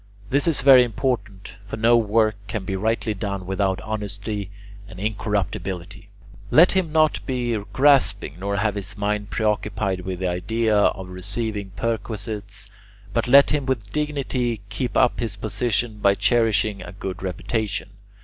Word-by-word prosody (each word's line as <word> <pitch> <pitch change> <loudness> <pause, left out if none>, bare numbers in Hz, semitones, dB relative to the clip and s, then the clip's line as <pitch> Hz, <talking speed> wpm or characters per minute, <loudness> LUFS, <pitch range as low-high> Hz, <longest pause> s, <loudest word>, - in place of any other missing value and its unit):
This 140 +5 +3
is 160 -5 +3
very 130 -1 +8
important, 115 -5 -3
for 110 - -5
no 115 +2 +4
work 110 -1 +3
can 105 -2 -4
be 95 - -2
rightly 110 +2 0
done 100 -2 -4
without 95 0 0
honesty 105 -1 -4 0.4
and 95 - -11
incorruptibility. 100 -1 -3 0.4
Let 170 +9 +6
him 185 -4 0
not 155 -1 +2
be 125 -3 -1 0.2
grasping 135 - +3
nor 100 +1 -2
have 105 0 +1
his 100 0 -4
mind 105 0 -1
preoccupied 105 -3 -1
with 90 0 -4
the 95 +1 -2
idea 110 +5 0
of 95 -2 +1
receiving 100 +2 -4
perquisites, 105 -2 -3 0.4
but 115 +1 0
let 140 +3 +7
him 145 -3 0
with 110 -6 -2
dignity 135 -6 -1
keep 120 +4 -2
up 120 - +3
his 115 -5 -2
position 110 +1 -1
by 100 -1 +4
cherishing 110 -3 +2
a 90 - -9
good 95 -1 -6
reputation. 100 +2 -3
105 Hz, 150 wpm, -23 LUFS, 100-120 Hz, 0.4 s, very